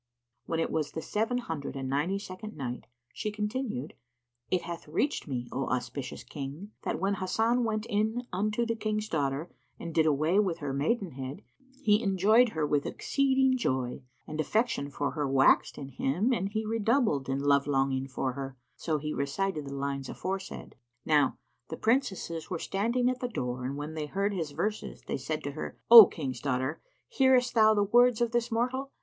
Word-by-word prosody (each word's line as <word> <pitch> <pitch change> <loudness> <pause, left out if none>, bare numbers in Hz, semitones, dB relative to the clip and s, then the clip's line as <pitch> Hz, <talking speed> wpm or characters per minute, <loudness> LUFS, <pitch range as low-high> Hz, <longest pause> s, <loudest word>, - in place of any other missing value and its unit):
When 165 - -1
it 165 - 0
was 155 -2 -1
the 160 - -4
Seven 225 +4 0
Hundred 160 - -4
and 135 -1 -4
Ninety 150 +9 0
second 200 0 -8
Night, 125 -3 -5 0.3
She 215 - -3
continued, 210 - -3 0.6
It 185 - +1
hath 170 -2 -7
reached 220 - -1
me, 125 -3 -3
O 135 0 -2
auspicious 125 +1 -3
King, 145 - -7
that - - -2
when 195 +1 +1
Hasan 225 +6 +1
went 215 -1 -1
in 220 +4 0
unto 215 +5 0
the 230 0 -1
King's 215 -1 -2
daughter 145 -2 -1 0.3
and 170 - -6
did 160 0 +3
away 155 +6 +3 0.2
her 145 -3 -3
maidenhead, 145 - -2 0.4
he 210 -3 +4
enjoyed 215 +4 +4
her 160 -7 -1
with 145 -1 0
exceeding 265 -1 +2
joy 130 - -1 0.2
and 155 0 -3
affection 215 -5 0
for 145 0 -2
her 150 -3 -2
waxed 135 0 +4
in 135 -1 -7
him 175 - 0
and 195 -4 -1
he 220 +1 -2
redoubled 220 - +1
in 135 - 0
love 140 0 +2
longing 135 -1 +1
for 130 -1 -2
her; 135 -1 -6 0.2
so 160 -2 -1
he 150 +1 -4
recited 150 +3 -2
the 140 - -5
lines 140 -1 -3
aforesaid. 190 +1 -5 0.3
Now 145 -3 +3 0.3
the 160 - -5
Princesses 205 - 0
were 180 - -2
standing 235 +8 0
at 255 0 0
the 250 - -2
door 125 - -3
and 135 +2 -3
when 150 +2 -5
they 155 -1 -4
heard 200 +5 -1
his 165 -5 -2
verses, 210 +8 -3
they - - -3
said 150 +3 -4
to 145 - -3
her, 155 - -6
"O 230 -4 +13
King's 130 -7 -5
daughter, 130 +1 -1 0.3
hearest 260 - +3
thou 220 -1 +5
the 205 - +3
words 240 +3 +4
of 235 -1 +1
this 240 0 0
mortal? 255 +4 -1
170 Hz, 180 wpm, -29 LUFS, 140-220 Hz, 0.6 s, O